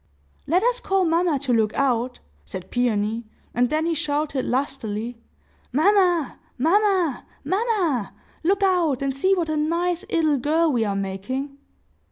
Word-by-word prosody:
'" 70 - -37
"Let 360 +6 +2
us - - +2
call 385 -5 +1
mamma 335 -2 +2
to 265 -2 -1
look 220 -2 +2
out," 250 -2 0 0.3
said 175 - -8
Peony; 225 -2 0 0.3
and 245 +1 +2
then 310 +1 0
he 335 - +1
shouted 295 -3 -1
lustily, 240 -3 -2 0.5
"Mamma! 350 0 +2 0.2
mamma!! 360 - +2 0.2
mamma!!! 375 - 0 0.3
Look 395 +4 +2
out, 340 -8 +2
and 270 -1 -1
see 375 +8 +3
what 345 -3 -1
a 310 - -1
nice 340 +4 0
'ittle 315 -7 +2
girl 315 +4 +2
we 240 -4 +1
are 200 -1 -1
making!" 200 +9 -4
295 Hz, 150 wpm, -23 LUFS, 245-350 Hz, 0.5 s, see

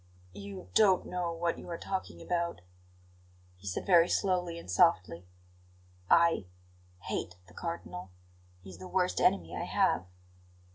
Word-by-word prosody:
"You 100 -2 -9
don't 195 -4 +5
know 180 -1 -2
what 170 0 -2
you - - -10
are 170 - -4
talking 175 - -5
about," 170 - -2 1.0
he 100 +2 -12
said 95 - -3
very 175 -2 +6
slowly 180 -3 0
and 170 - -10
softly. 90 -1 +2 0.8
"I 170 - +4 0.5
hate 90 - -4
the 90 - -17
Cardinal. 95 - -6 0.5
He 95 - -10
is 90 - -12
the 95 - -8
worst 185 -1 0
enemy 85 -3 +2
I - - -3
have." 90 - +1
165 Hz, 140 wpm, -31 LUFS, -, 1.0 s, very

